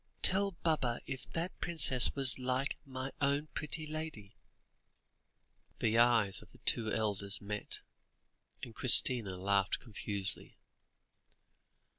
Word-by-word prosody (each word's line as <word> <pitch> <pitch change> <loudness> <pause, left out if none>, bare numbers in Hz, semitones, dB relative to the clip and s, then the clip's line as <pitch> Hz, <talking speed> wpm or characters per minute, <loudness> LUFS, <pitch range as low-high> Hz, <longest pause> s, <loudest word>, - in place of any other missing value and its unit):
"Tell 195 +1 +1
Baba 130 -8 -1
if 135 -2 -8
that 170 +3 -5
princess 140 -7 +2
was 135 -2 +6
like 130 +2 -1
mine 130 0 -6
own 140 +2 -1
pretty 155 +1 -4
lady." 155 -10 -8 1.4
The 115 +1 0
eyes 115 -5 +3
of - - -17
the - - -18
two 110 -2 -2
elders 100 -2 -2
met, 105 0 -1 0.8
and 115 - -8
Christina 115 -4 +5
laughed 100 +1 0
confusedly. 100 -4 -7
125 Hz, 110 wpm, -32 LUFS, 105-145 Hz, 1.4 s, was